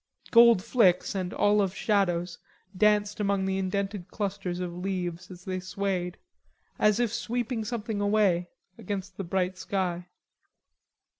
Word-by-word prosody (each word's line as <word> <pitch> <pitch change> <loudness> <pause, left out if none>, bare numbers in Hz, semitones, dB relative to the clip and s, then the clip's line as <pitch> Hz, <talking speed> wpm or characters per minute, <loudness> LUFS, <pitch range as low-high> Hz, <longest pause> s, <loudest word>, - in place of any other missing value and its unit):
Gold 235 -5 +7
flicks 225 -6 +3
and 185 -2 -3
olive 205 -2 +2
shadows 180 -4 0 0.4
danced 210 +1 +2
among 200 -2 +1
the 190 0 0
indented 195 0 -2
clusters 195 -4 -3
of 180 -1 -4
leaves 180 -1 -4
as 180 -1 -12
they 185 -1 -2
swayed, 185 -1 -3 0.6
as 210 +1 +3
if 235 -2 +1
sweeping 240 -1 -2
something 220 -2 -3
away, 200 -4 +2 0.3
against 195 -2 -5
the 195 - -3
bright 185 +1 -1
sky. 180 -3 -2
195 Hz, 130 wpm, -28 LUFS, 180-210 Hz, 0.6 s, Gold